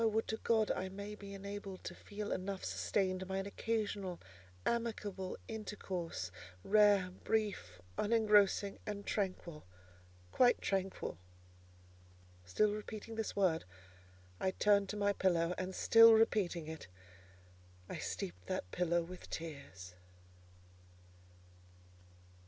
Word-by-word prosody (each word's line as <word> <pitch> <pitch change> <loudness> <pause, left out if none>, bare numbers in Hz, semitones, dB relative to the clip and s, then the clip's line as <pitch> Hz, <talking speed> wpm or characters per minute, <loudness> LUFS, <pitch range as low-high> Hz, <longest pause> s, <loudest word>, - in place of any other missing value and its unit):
would 220 +1 +1
to 220 - -2
God 220 -3 +2
I 190 0 -2
may 200 +2 -6
be 200 -1 -8
enabled 200 -1 -7
to - - -5
feel 205 0 -6
enough 190 +1 -3
sustained 185 -2 0
by 190 0 -2
an 195 - -2
occasional, 200 -4 -2 0.5
amicable 210 -5 -2
intercourse, 185 - -4 0.3
rare, 205 -3 +5
brief, 200 - -1 0.2
unengrossing 210 -2 +4
and 205 -1 -4
tranquil: 185 -6 -2 0.7
quite 245 -1 +5
tranquil!" 190 - -2 1.3
Still 210 - +3
repeating 215 +1 -6
this 225 -1 -3
word, 185 -5 +2 0.8
I 190 - +1
turned 200 +1 +3
to 210 - -3
my 205 0 +2
pillow; 175 -3 +2
and 185 0 -3
still 230 0 +8
repeating 200 -7 +2
it, 160 -6 -7 1.0
I - - -5
steeped 90 0 -5
that 90 - -3
pillow 175 -1 +1
with 180 +2 -10
tears. 140 - -7
200 Hz, 110 wpm, -36 LUFS, 180-210 Hz, 1.3 s, still